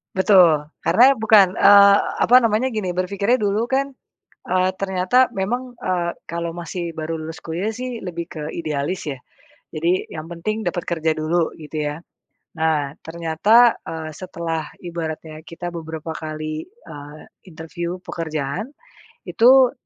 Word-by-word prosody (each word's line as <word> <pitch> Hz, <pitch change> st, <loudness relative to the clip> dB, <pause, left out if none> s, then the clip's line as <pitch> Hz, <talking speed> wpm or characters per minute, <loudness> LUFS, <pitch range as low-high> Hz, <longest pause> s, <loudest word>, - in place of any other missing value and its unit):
Betul, 185 Hz, -6 st, +5 dB, 0.2 s
karena 240 Hz, +10 st, +5 dB
bukan, 210 Hz, -4 st, +5 dB
eee, 200 Hz, 0 st, +8 dB, 0.2 s
apa 250 Hz, +2 st, +7 dB
namanya, 230 Hz, +1 st, +1 dB
gini 205 Hz, -6 st, -3 dB
berpikirnya, 200 Hz, +5 st, 0 dB
dulu 215 Hz, -1 st, 0 dB
kan, 270 Hz, +2 st, 0 dB, 0.6 s
eee, 185 Hz, 0 st, +2 dB
ternyata 190 Hz, +6 st, +2 dB
memang, 245 Hz, +5 st, -3 dB
eee, 175 Hz, -2 st, -1 dB, 0.2 s
kalau 170 Hz, 0 st, -3 dB
masih 170 Hz, 0 st, -5 dB
baru 160 Hz, +1 st, -3 dB
lulus 160 Hz, 0 st, -6 dB
kuliah, 175 Hz, +6 st, -3 dB
sih, 245 Hz, +1 st, -6 dB
lebih 170 Hz, -2 st, -5 dB
ke 155 Hz, -, -6 dB
idealis, 160 Hz, +3 st, -3 dB
ya, 140 Hz, -3 st, -4 dB, 0.6 s
jadi 170 Hz, +4 st, 0 dB
yang 160 Hz, +1 st, -7 dB
penting 215 Hz, +6 st, -3 dB
dapat 175 Hz, -2 st, -3 dB
kerja 160 Hz, -2 st, 0 dB
dulu, 160 Hz, +2 st, 0 dB
gitu, 150 Hz, -1 st, -4 dB
ya. 150 Hz, -, -7 dB, 0.6 s
Nah, 155 Hz, -3 st, 0 dB
ternyata, 170 Hz, +9 st, +3 dB
eee, 160 Hz, -1 st, -6 dB
setelah 165 Hz, -4 st, -5 dB
ibaratnya 160 Hz, -2 st, -6 dB
kita 170 Hz, +2 st, -7 dB
beberapa 160 Hz, -1 st, -6 dB
kali, 155 Hz, -1 st, -5 dB
eee, 150 Hz, -, -12 dB, 0.3 s
interview 170 Hz, +3 st, -6 dB
pekerjaan, 165 Hz, -, -4 dB, 0.5 s
itu, 255 Hz, +1 st, +5 dB
170 Hz, 135 wpm, -21 LUFS, 160-205 Hz, 0.6 s, eee